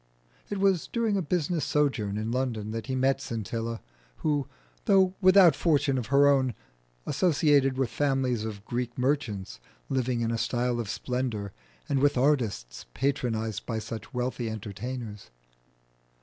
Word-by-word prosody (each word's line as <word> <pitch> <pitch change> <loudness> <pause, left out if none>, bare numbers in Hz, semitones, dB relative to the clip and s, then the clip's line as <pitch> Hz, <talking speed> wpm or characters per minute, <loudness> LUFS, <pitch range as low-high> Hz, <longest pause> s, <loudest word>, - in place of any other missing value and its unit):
It 205 - -2
was 195 -3 +2
during 230 -3 0
a 195 - +1
business 170 -1 0
sojourn 125 -9 0
in 110 +2 -2
London 120 -4 -2
that 115 -1 -5
he 130 - -1
met 135 +1 +2
Scintilla, 115 -1 -4 0.4
who, 145 -3 +1 0.4
though 190 -2 +4
without 185 -4 +7
fortune, 145 -4 +2 1.0
associated 145 -4 +3
with 130 -4 0
families 135 -5 0
of 105 -2 -6
Greek 120 0 -3
merchants 125 - -1 0.3
living 125 -2 0
in 115 0 0
a 115 - -1
style 120 0 0
of 115 -4 -3
splendour, 115 -5 -3 0.3
and 140 - +1
with 145 0 +3
artists 120 - 0
patronised 115 -6 -1
by 115 - -2
such 110 -1 -6
wealthy 125 -1 -2
entertainers. 110 - -6
125 Hz, 135 wpm, -28 LUFS, 110-145 Hz, 1.0 s, without